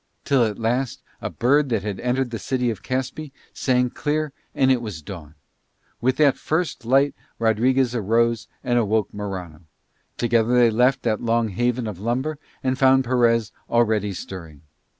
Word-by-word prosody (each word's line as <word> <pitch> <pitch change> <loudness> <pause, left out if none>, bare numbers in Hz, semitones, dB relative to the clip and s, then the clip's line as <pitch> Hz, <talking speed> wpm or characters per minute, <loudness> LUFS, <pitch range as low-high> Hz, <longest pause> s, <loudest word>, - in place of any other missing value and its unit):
Till 135 -4 +3
at 105 -3 -1
last 120 +3 -1 0.2
a - - -3
bird 140 +4 +2
that 110 -5 0
had 100 -2 -4
entered 125 0 -1
the 115 - -4
city 125 +1 0
of 105 - -7
Caspe 130 +4 -3 0.2
sang 125 -1 +1
clear 150 -1 -2 0.2
and 130 -1 +4
it 125 -2 +2
was 100 -9 -6
dawn. 80 -5 -9 0.7
With 130 +3 +2
that 145 -3 +4
first 160 -6 -2
light 135 +4 +3 0.2
Rodriguez 120 +3 +2
arose 115 +1 +1 0.2
and 120 0 +2
awoke 110 -1 0
Morano. 95 -6 -6 0.6
Together 120 0 +2
they 120 -2 +5
left 125 +4 +2
that 110 -3 0
long 115 -1 +1
haven 120 +4 0
of 105 -5 -5
lumber 130 +8 -2 0.2
and 130 0 0
found 130 0 +5
Perez 115 -3 +2 0.2
already 110 -3 +2
stirring. 85 -5 -8
120 Hz, 160 wpm, -23 LUFS, 110-130 Hz, 0.7 s, they